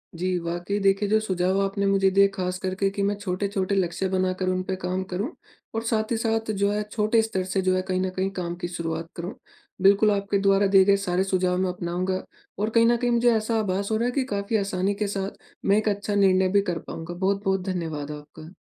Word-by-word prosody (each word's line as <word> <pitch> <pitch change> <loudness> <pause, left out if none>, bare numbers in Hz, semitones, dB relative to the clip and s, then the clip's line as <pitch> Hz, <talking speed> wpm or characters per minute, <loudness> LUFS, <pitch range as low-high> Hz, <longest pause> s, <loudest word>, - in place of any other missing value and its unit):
जी, 180 +1 -1
वाक़ई 175 +4 -3
देखिए 195 +1 +2
जो 215 +1 +4
सुझाव 185 -2 0
आपने 200 0 -1
मुझे 195 -1 +3
दिए 200 +1 +5
खास 180 -1 -2
करके 190 +1 -1
कि 200 0 -2
मैं 200 +1 +1
छोटे-छोटे 200 0 -2
लक्ष्य 185 0 0
बनाकर 185 0 0
उन 185 0 0
पे 190 0 -3
काम 185 +1 -1
करूँ 205 - -2 0.4
और 225 - -1
साथ 220 -1 0
ही 230 - +2
साथ 225 -1 0
जो 200 0 +1
है 210 0 0
छोटे 215 +1 +2
स्तर 220 -4 -2
से 190 +1 -1
जो 185 0 +2
है 185 - +1
कहीं 185 0 0
न 190 - 0
कहीं 190 +1 0
काम 175 -1 -3
की 175 - -1
शुरुआत 165 -1 -4
करूँ। 175 +2 -5 0.5
बिल्कुल, 200 +2 +5
आपके 200 0 0
द्वारा 195 0 +3
दिए 195 -1 +6
गए 200 - +5
सारे 185 -1 0
सुझाव 185 -1 +1
मैं 185 0 +1
अपनाऊँगा 180 +1 -2 0.4
और 210 +2 0
कहीं 230 +1 +4
न 240 0 +4
कहीं 245 0 0
मुझे 235 +1 +4
ऐसा 220 +1 0
आभास 200 0 -1
हो 220 - +2
रहा 235 - 0
है 245 - +1
कि 270 0 0
काफ़ी 200 +2 0
आसानी 195 -1 0
के - - 0
साथ 195 0 -4 0.3
मैं 200 +1 +4
एक 215 0 +1
अच्छा 205 0 -2
निर्णय 190 -2 +4
भी 200 - +5
कर 170 - -3
पाऊँगा। 165 +1 -6
बहुत-बहुत 195 +1 0
धन्यवाद 160 -5 -3
आपका। 150 +2 -10
195 Hz, 230 wpm, -25 LUFS, 185-205 Hz, 0.5 s, दिए